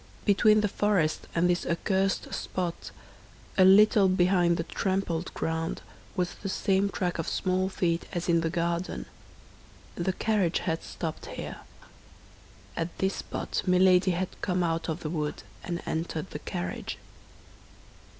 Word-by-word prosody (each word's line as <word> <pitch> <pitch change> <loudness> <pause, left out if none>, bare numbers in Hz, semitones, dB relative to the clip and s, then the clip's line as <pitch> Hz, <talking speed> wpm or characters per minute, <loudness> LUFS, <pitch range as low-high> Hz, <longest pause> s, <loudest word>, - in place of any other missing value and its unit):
Between 215 +1 +5
the 210 - +2
forest 195 -6 +1
and 170 +1 +3
this 175 -1 +1
accursed 190 +3 0
spot, 175 -2 -3 0.7
a 190 - +6
little 200 +1 +7
behind 180 -2 +3
the 165 - -1
trampled 185 -2 -1
ground, 160 0 -2 0.3
was 180 -2 -1
the 195 - -6
same 195 +1 +1
track 180 -4 -2
of 165 - -2
small 185 0 0
feet 170 -3 -1
as 175 -2 -3
in 170 -1 +3
the 165 - 0
garden; 170 +1 -2 0.9
the 180 +2 -1
carriage 200 -4 +1
had 165 -2 -1
stopped 160 -2 -5
here. - - -6 1.2
At 165 +1 -3
this 190 0 0
spot - - -3
Milady 180 0 +5
had 180 +1 -2
come 180 -2 0
out 165 -1 -1
of 160 +2 -3
the 155 - -3
wood, 150 -3 -3 0.2
and 175 -1 -4
entered 160 +1 -3
the 150 - -5
carriage. 90 -10 -4
180 Hz, 140 wpm, -28 LUFS, 170-190 Hz, 1.2 s, little